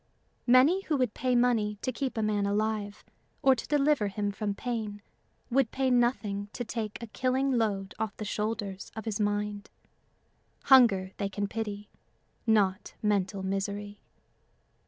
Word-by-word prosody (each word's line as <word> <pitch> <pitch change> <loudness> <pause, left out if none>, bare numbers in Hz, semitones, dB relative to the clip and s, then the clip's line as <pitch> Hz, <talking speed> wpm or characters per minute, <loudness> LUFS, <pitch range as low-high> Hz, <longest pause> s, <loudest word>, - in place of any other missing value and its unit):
Many 265 +10 +6
who 300 - +1
would 250 -5 0
pay 255 0 0
money 230 -4 +2
to 255 - 0
keep 255 0 -3
a 220 - +1
man 205 -1 +1
alive 210 0 -1 0.4
or 270 - +7
to 250 - -5
deliver 290 -6 +2
him 205 +1 -2
from 205 0 -3
pain 215 -3 -4 0.5
would 260 -2 +3
pay 265 -1 0
nothing 210 -5 +1
to 245 - -3
take 220 -2 -4
a - - -2
killing 260 +4 0
load 205 -6 0
off 220 -2 -3
the 215 - -5
shoulders 210 -2 -3
of 220 - -6
his 220 -2 -2
mind. 205 0 -1 0.9
Hunger 225 -9 +6
they 200 -1 -2
can 205 +1 -2
pity 210 -1 -4 0.6
not 205 -3 +2
mental 200 -2 0
misery. 200 +1 -3
215 Hz, 150 wpm, -29 LUFS, 205-245 Hz, 0.9 s, or